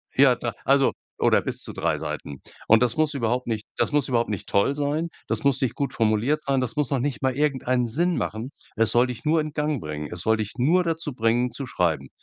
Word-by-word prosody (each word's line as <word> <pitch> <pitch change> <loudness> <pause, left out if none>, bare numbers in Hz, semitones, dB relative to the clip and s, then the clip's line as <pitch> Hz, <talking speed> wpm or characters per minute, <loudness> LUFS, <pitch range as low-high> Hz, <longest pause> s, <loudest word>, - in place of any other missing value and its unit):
ja 135 -1 +6
da 120 -2 -4
also 135 0 +4 0.3
oder - - +4
bis - - -4
zu - - -8
3 - - 0
Seiten. 70 -2 -5 0.3
Und 110 +1 +6
das 120 -2 +1
muss 155 -1 +2
überhaupt 125 -1 -1
nicht 110 -2 -2
das - - +1
muss 145 -2 +1
überhaupt 120 -3 +1
nicht 100 - -4
toll 100 +8 +2
sein. 145 +3 -1 0.2
Das - - -1
muss 140 -2 +2
nicht 130 - 0
gut 140 -2 -2
formuliert 115 +7 +1
sein. 135 -2 +1
Das 130 +5 -1
muss 150 -3 0
noch 140 - +1
nicht 140 +1 -2
mal 130 -2 +1
irgendeinen 130 -4 +1
Sinn 170 +9 +1
machen. 110 +4 -3 0.3
Es 115 0 +2
soll 120 +1 +4
dich 125 -2 -7
nur 160 +2 +3
in 155 0 -2
Gang 150 -2 -1
bringen. 75 -3 -5
Es 90 - -5
soll 110 +3 +2
dich 105 -2 -4
nur 165 +9 +3
dazu 165 -3 -3
bringen, 120 +1 +1
zu 130 +3 -6
schreiben. 80 - 0
125 Hz, 235 wpm, -24 LUFS, 115-145 Hz, 0.3 s, ja